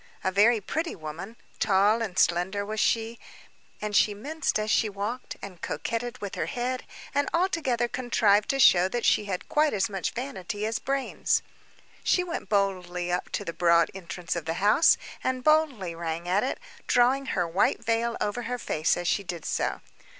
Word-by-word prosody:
A 190 - +1
very 215 +4 +4
pretty 320 - -3
woman, 165 +7 -7 0.2
tall 205 +2 +3
and 195 -5 -4
slender 185 +4 +2
was 215 +1 -4
she, 225 +1 +1 0.6
and 210 -1 -3
she 205 0 +4
minced 305 +10 -2
as 215 0 -1
she 220 - +3
walked, 205 +5 -5
and 185 -4 -9
coquetted 240 +1 -3
with 200 -2 -6
her - - -2
head, 250 +1 -3 0.3
and, 285 +1 +1
altogether 310 -10 +1
contrived 230 -4 +2
to 275 - +1
show 185 -7 +6
that 240 +4 -2
she 210 - +3
had 190 -3 -4
quite 305 0 +2
as 200 0 +1
much 195 -2 -2
vanity 215 -5 -4
as 220 0 -1
brains. 275 -1 0 0.6
She 360 - +3
went 350 -1 -5
boldly 180 -3 0
up 180 - -1
to - - -2
the 170 - -4
broad 170 -1 +3
entrance 175 -2 -5
of 170 -2 -4
the 165 0 -2
house, 205 - +5 0.3
and 255 -1 -1
boldly 290 - +2
rang 165 0 -4
at 190 +3 +2
it, 260 - -2 0.3
drawing 260 +2 +3
her 180 -8 0
white 175 +5 +1
veil 230 +1 0
over 210 +4 -1
her 250 - -1
face 155 -9 0
as 175 0 -3
she 200 - +1
did 175 -4 -6
so. - - -1
210 Hz, 180 wpm, -27 LUFS, 180-245 Hz, 0.6 s, show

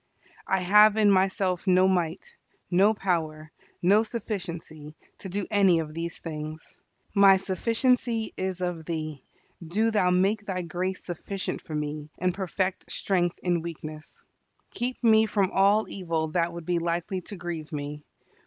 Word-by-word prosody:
I 190 -1 +1
have 210 +3 +6
in 210 -2 +5
myself 190 -1 +1
no 185 0 +5
might, 180 -1 -1 0.4
no 200 +5 +4
power, 155 -5 -2 0.3
no 200 +5 +5
sufficiency, 175 -9 -6 0.2
to 190 - -7
do 195 +1 -2
any 195 -4 +5
of 155 -2 -3
these 165 +1 -4
things. 155 -1 -8 0.3
My 200 -2 +7
sufficiency 230 +4 0
is 185 -1 -3
of 175 -3 -3
Thee. 155 -4 -4 0.4
Do 215 +8 +1
Thou 205 -4 +3
make 195 +4 +2
Thy 185 -3 -3
grace 180 +3 -3
sufficient 185 +2 -4
for 155 - -7
me, 150 0 -4
and 180 0 0
perfect 190 0 -3
strength 175 -3 0
in 175 -2 +1
weakness. 155 -2 -9 0.5
Keep 250 +1 -4
me 220 -1 +5
from 200 -3 +1
all 200 +3 +4
evil 165 -4 -2
that 170 +1 0
would 170 -1 -8
be 175 0 +1
likely 175 +3 -2
to 200 - -9
grieve 175 -4 -6
me. 150 0 -5
180 Hz, 150 wpm, -27 LUFS, 165-200 Hz, 0.5 s, My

